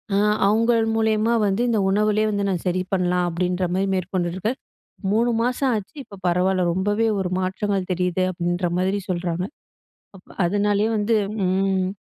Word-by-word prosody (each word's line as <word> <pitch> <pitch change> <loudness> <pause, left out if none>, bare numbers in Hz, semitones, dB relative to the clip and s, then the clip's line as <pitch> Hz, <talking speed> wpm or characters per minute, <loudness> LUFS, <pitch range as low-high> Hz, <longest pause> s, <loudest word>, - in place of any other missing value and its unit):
அ - - +3 0.3
அவங்கள் 230 +2 +3
மூலியமா 220 +1 +2
வந்து 200 +3 0
இந்த 225 -2 +2
உணவுலயே 210 +2 +2
வந்து 200 -1 -1
நான் 180 -4 -2
சரி 180 +1 +1
பண்ணலாம் 180 -1 +1
அப்டின்ற 180 +2 -1
மாரி 190 +2 0
மேற்கொண்டிருக்க, 185 +1 -2 0.6
3 230 +3 +2
மாசம் 250 +3 0
ஆச்சு. 210 +8 -6
இப்ப 200 -5 -13
பரவால்ல 180 +1 +2
ரொம்பவே 205 +5 +1
ஒரு 190 -2 -1
மாற்றங்கள் 190 +1 -2
தெரியுது, 180 0 0
அப்டின்ற 175 0 -1
மாரி 190 +2 0
சொல்றாங்க. 175 -1 -2 0.7
அப்ப 185 - -19 0.2
அதனாலயே 205 +3 +1
வந்து 210 +2 +1 0.3
ம். 190 0 +1
190 Hz, 145 wpm, -22 LUFS, 180-210 Hz, 0.7 s, அ